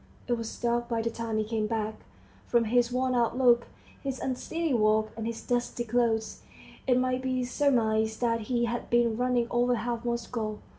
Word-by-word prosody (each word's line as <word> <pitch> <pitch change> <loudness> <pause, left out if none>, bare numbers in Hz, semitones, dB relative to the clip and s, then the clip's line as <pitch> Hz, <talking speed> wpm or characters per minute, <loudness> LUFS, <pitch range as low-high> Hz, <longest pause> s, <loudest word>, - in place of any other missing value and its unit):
It 245 - +1
was 230 -1 -4
dark 240 0 0
by 230 -1 0
the 230 - -1
time 225 -1 -3
he 215 - +1
came 215 0 -1
back. 220 -1 -1 0.5
From 235 -1 +3
his 240 +2 +2
worn 255 +1 +1
out 240 0 +1
look, 240 -2 +4 0.3
his 270 -2 -3
unsteady 315 +4 -2
walk, 215 -1 +3
and 225 0 -4
his 230 -1 -5
dusty 245 0 -1
clothes, 230 -1 0 0.5
it 250 -1 +4
might 255 0 +1
be 255 -1 -1
surmised 220 -5 +1
that 230 -1 +2
he 240 -1 +2
had 235 +1 -3
been 235 -1 +3
running 245 0 +1
over 245 +1 +2
half 235 +1 -3
Moscow. 235 -2 -2
235 Hz, 185 wpm, -28 LUFS, 225-245 Hz, 0.5 s, look